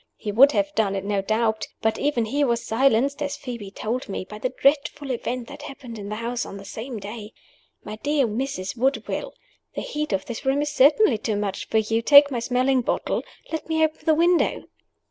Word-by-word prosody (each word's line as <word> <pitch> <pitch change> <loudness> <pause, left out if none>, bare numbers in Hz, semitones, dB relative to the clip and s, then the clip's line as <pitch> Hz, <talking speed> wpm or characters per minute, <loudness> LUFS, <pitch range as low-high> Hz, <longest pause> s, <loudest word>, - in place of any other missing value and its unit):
He 210 - -5
would 275 +7 +6
have 300 0 0
done 205 -5 +1
it 195 - -3
no 200 -1 0
doubt. 220 +1 0 0.2
But 220 0 +1
even 280 -6 +1
he 285 +7 0
was 235 -3 0
silenced 270 +4 +2
(as 285 -1 -2
Phoebe 235 -6 -7
told 225 +5 -4
me) 195 - -4
by 210 +2 -10
the 255 - -1
dreadful 280 +1 +1
event 245 0 -3
that - - -10
happened 245 -5 -9
in 200 0 -7
the 210 - -3
house 235 +2 -3
on 200 - -8
the 195 - -10
same 230 +4 -6
day. 210 +2 -8 0.5
My 210 +1 -7
dear 290 +3 +1
Mrs. 225 -3 -3
Woodville! 270 - -1 0.4
the - - -2
heat 300 -2 -3
of 190 -1 -1
this 235 +2 -6
room 275 +2 +1
is 295 - -3
certainly 290 - +4
too 215 0 -1
much 205 -1 -3
for 225 - +1
you, 225 +1 +1
take 285 +3 +7
my 245 - -1
smelling 255 +2 +1
bottle. - - -1 0.3
Let 320 0 -4
me 320 0 +2
open 310 0 -1
the 315 - +4
window." 345 +2 +2
245 Hz, 210 wpm, -24 LUFS, 215-285 Hz, 0.5 s, take